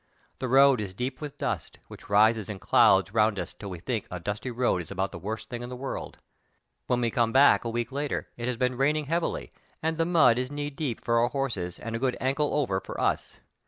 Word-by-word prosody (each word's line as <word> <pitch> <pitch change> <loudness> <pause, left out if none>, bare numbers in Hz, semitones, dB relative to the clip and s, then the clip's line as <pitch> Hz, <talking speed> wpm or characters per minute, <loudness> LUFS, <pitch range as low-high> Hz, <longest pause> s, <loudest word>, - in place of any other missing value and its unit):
The 130 - -2
road 135 -1 +5
is 95 -3 -6
deep 130 +6 -4
with 145 -2 -6
dust, - - -3
which - - -13
rises 110 +1 +4
in 105 - -4
clouds 95 +1 +4
around 110 -1 +2
us - - -4
till 100 - -8
we 90 - -6
think 110 +5 -3
a 90 - -5
dusty 105 +7 -4
road 120 -6 +1
is 80 - -10
about 95 +2 -2
the 90 - -8
worst 110 +4 -5
thing 120 0 -6
in 120 - -6
the 125 - -6
world*. 135 +2 -6 0.7
When 125 0 +1
we 120 -1 +1
come 115 -1 +1
back 135 +3 +6
a 115 - -2
week 120 0 -2
later 145 +1 -2
it 120 0 -4
has 125 -2 -1
been 125 0 0
rain 140 +3 +3
ing 155 -1 -2
heavily 165 +4 -2 0.3
and 160 0 -1
the 165 - +2
mud 140 -9 +5
is 130 +2 -3
knee 145 0 -3
deep 135 -5 -4
for 115 0 +3
our 120 - +3
horses 115 -11 -3
and 115 0 -5
a - - -2
good 130 0 0
"ankle 140 +3 0
over" 105 -11 +1
for - - -8
us. - - -1
120 Hz, 240 wpm, -27 LUFS, 105-135 Hz, 0.7 s, back